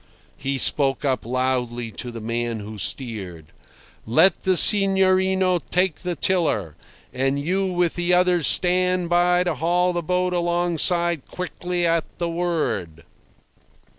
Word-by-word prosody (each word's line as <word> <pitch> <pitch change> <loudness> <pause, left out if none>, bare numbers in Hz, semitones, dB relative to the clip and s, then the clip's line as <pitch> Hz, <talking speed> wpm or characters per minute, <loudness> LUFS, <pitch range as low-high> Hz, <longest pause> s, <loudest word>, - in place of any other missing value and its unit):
He 135 0 -3
spoke 135 0 +1
up 130 -4 -2
loudly 125 -2 -2
to 120 - -6
the 115 -1 -8
man 115 0 -3
who 105 +1 -9
steered. 95 - -3 0.6
"Let 125 +12 +4
the 185 -1 +2
signorino 190 -2 +4
take 180 -2 0
the 180 -1 -4
tiller, 150 - 0 0.4
and 135 +2 -1
you 185 +7 -1
with 175 -2 0
the 175 0 -2
others 180 -2 +3
stand 180 -1 +2
by 175 +1 +2
to 175 -2 -2
haul 175 +4 0
the 175 - -2
boat 180 +2 -1
alongside 175 -2 +1
quickly 180 -1 -4
at 165 -1 0
the 170 -1 -3
word." 165 - -3
170 Hz, 135 wpm, -21 LUFS, 130-180 Hz, 0.6 s, Let